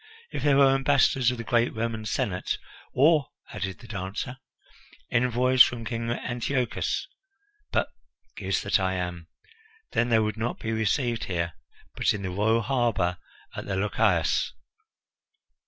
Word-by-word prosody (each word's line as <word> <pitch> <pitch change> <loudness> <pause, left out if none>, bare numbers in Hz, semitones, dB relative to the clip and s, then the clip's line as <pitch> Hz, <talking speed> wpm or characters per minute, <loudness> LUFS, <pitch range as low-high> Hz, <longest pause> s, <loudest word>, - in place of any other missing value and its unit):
If - - -4
there 145 -2 +4
were 135 -1 +6
ambassadors 135 -2 +3
of 125 - -2
the 115 - -5
great 120 0 +1
Roman 110 -1 -2
Senate 100 -9 -1 0.2
" - - -23
"Or," 150 +1 +4 0.3
added 95 -1 -4
the 120 - -14
dancer, 100 +4 -5 0.7
"envoys 125 +1 +3
from 115 -2 +5
King 115 0 -3
Antiochus. 125 +2 -1 0.6
But - - +1 0.5
goose 95 -1 -1
that 100 +1 +2
I 95 0 0
am! 90 -2 -4 0.6
then 120 - +1
they 115 - +5
would 110 0 0
not 115 +2 -2
be 115 - -3
received 115 +2 0
here, 85 -2 -2 0.4
but - - +2
in 100 - -6
the 95 - -3
royal 110 +4 +2
harbour 110 -8 0 0.4
at - - -6
the 95 - -1
Lochias. 100 +2 +1
115 Hz, 145 wpm, -27 LUFS, 100-125 Hz, 0.7 s, were